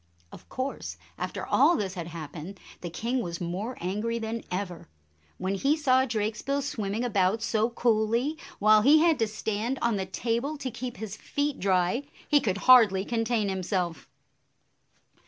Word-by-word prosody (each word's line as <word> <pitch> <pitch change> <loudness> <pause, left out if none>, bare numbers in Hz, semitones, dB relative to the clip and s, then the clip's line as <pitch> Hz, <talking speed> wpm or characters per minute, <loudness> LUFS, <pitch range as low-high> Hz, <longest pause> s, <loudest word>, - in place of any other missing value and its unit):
Of - - -14
course, 265 +2 -4 0.2
after - - -4
all 345 - +4
this 195 -3 -2
had 170 -3 -5
happened, 165 +3 -8 0.2
the 175 - -4
king 235 +9 -2
was 170 -5 -5
more 185 +8 -4
angry 210 +6 -2
than 225 0 -4
ever. 180 - -4 0.5
When 190 +1 -2
he 275 +10 +2
saw 260 -3 +3
Drakesbill 230 +5 -1
swimming 220 -4 -2
about 205 -2 +1
so 220 +1 +1
coolly, 235 +4 +1 0.2
while 215 +1 +5
he 285 +7 +7
had 320 -2 +3
to 225 - +2
stand 220 +4 -2
on 235 -3 +1
the 190 -1 -3
table 235 +9 -2
to 265 -3 -4
keep 245 +1 -6
his 215 -2 -6
feet 285 +4 -2
dry, 190 +7 +1 0.2
he 295 - +5
could 200 -6 0
hardly 220 -7 +7
contain 225 -2 0
himself. 185 -3 -2
220 Hz, 155 wpm, -27 LUFS, 190-250 Hz, 0.5 s, he